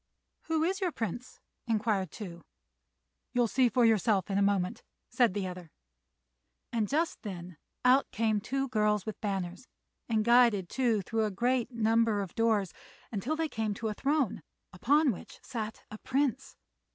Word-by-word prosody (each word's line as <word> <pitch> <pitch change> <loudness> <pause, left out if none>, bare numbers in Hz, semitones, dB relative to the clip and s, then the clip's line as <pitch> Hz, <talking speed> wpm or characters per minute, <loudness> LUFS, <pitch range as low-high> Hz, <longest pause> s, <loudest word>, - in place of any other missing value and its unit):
"Who 320 -1 +1
is 380 +4 0
your 365 -2 +1
Prince?" 240 - -5 0.3
inquired 215 -4 0
Tou. 175 -4 -8 0.9
"You'll 245 -2 +3
see 255 +2 +3
for 240 +2 +3
yourself 210 -3 +2
in 195 - +2
a - - +2
moment," 200 -2 +1 0.3
said 240 -7 +3
the 200 -2 -1
other; 180 -2 -7 1.0
and 220 -3 +1
just 320 +4 0
then 180 -5 -7 0.3
out 260 +2 +5
came 215 -1 0
two 270 +5 -1
girls 210 -3 +1
with 220 - -6
banners, 195 +2 -3 0.4
and 215 -2 +1
guided 235 -6 +5
Tou 235 -6 +1
through 220 +3 0
a - - 0
great 240 +4 0
number 225 -2 +2
of 195 - -6
doors 220 -5 +1 0.4
until 235 +8 -2
they 320 0 0
came 220 -6 -2
to 220 +1 -3
a - - -2
throne, 275 - 0 0.3
upon 280 - +3
which 195 - -10
sat 220 -2 -5
the 215 - -8
Prince. 265 -1 -1
225 Hz, 160 wpm, -30 LUFS, 200-250 Hz, 1.0 s, out